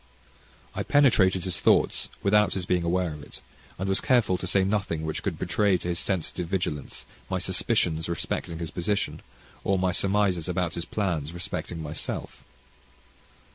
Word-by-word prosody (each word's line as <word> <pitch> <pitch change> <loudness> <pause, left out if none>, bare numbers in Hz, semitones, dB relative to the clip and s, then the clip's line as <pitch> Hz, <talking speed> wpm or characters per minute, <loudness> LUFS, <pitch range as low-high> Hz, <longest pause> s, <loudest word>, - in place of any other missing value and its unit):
I - - -2
penetrated 100 -10 +4
his 95 - -1
thoughts - - +3
without 105 +1 +4
his 95 -2 -2
being 90 -1 +1
aware 85 -1 0
of 75 - -9
it, 70 - -11 0.4
and 95 - -3
was 95 0 +2
careful 120 -8 +3
to 90 - -3
say 95 +1 +3
nothing 95 -5 -1
which 80 -1 -3
could - - -2
betray 100 -3 +2
to 85 +1 -5
his 85 0 -1
sensitive 90 -2 -2
vigilance 85 -6 -3 0.2
my - - 0
suspicions 80 0 +1
respecting 85 0 -3
his 80 -1 -5
position, 100 +3 -1 0.4
or 95 - +2
my 90 0 +1
surmises 95 -3 +1
about 90 -2 -1
his 85 - -4
plans 85 -6 -2
respecting 85 -1 -5
myself. 75 +1 -5
90 Hz, 160 wpm, -27 LUFS, 85-95 Hz, 0.4 s, penetrated